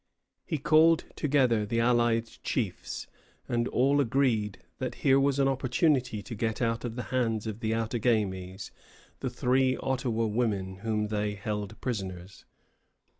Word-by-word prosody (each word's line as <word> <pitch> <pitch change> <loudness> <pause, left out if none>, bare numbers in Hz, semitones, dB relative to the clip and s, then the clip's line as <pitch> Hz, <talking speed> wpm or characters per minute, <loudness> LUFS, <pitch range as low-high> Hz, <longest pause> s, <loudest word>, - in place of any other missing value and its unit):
He 160 - -1
called 160 +3 +4
together 130 -7 +2
the 115 +3 -1
allied 120 -1 +3 0.2
chiefs, 110 -9 -3 0.4
and 120 0 0
all 140 +3 +3
agreed 115 -5 +1 0.2
that - - -3
here 135 0 +6
was 140 0 +2
an 135 -1 +3
opportunity 130 -3 +1
to - - -7
get 110 0 -2
out 115 -1 0
of 120 -2 -4
the 125 - -3
hands 115 -4 0
of 110 -1 -4
the 110 -1 0
Outagamies 105 -5 -1 0.5
the - - -2
three 130 +1 +2
Ottawa 125 -4 -1
women 105 -4 -1
whom 105 0 -1
they 105 -1 -1
held 105 0 -4
prisoners. 95 -6 -5
115 Hz, 140 wpm, -29 LUFS, 105-130 Hz, 0.5 s, here